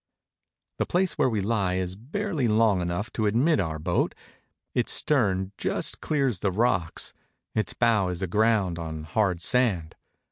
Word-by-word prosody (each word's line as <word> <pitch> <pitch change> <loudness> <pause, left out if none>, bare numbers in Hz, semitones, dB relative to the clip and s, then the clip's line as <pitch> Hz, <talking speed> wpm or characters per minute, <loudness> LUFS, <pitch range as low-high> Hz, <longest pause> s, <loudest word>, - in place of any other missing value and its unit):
The - - 0
place 185 +1 +1
where - - +2
we 110 -4 0
lie 100 -3 0
is 90 0 -2
barely 150 - -2
long 105 -3 +3
enough 90 +6 -3
to 110 -2 0
admit 135 +10 +3
our 80 -4 -1
boat; 85 +3 0 0.6
its - - +1
stern 95 -9 +1
just - - -2
clears 135 - 0
the 95 - 0
rocks, 90 -5 0 0.4
its 110 - 0
bow 115 -5 +2
is 90 +1 -3
aground 100 -2 +2
on 80 -1 -5
hard 90 +1 0
sand. 105 -12 +1
105 Hz, 150 wpm, -26 LUFS, 90-120 Hz, 0.6 s, long